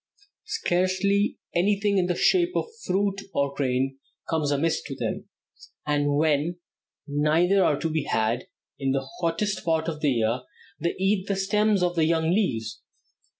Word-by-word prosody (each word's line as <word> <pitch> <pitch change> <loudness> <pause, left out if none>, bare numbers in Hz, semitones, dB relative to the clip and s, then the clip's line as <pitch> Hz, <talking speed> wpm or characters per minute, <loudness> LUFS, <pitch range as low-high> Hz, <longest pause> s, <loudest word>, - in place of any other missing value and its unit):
Scarcely 190 +3 +1 0.2
anything 200 +2 +2
in 180 - +1
the 180 - 0
shape 360 - +3
of - - +1 0.2
fruit 195 +1 0
or 140 0 +1
grain 135 0 -1 0.3
comes 160 -3 0
amiss 145 +3 +1
to - - -7
them, - - -4 0.6
and 145 -1 +1
when 155 +3 +1 0.5
neither 160 +6 +3
are 145 - +2
to 165 - -1
be 155 -2 -1
had, 110 +3 0 0.3
in 135 -1 0
the 135 -1 -2
hottest 180 +5 -1
part 160 -1 0
of 155 -2 -4
the 150 - +3
year 115 0 +1 0.4
they 170 +2 -1
eat 195 0 +1
the 200 - 0
stems 205 0 +2
of 175 0 +1
the 160 -2 +3
young 160 0 +2
leaves. 175 - -1
165 Hz, 155 wpm, -26 LUFS, 145-195 Hz, 0.6 s, shape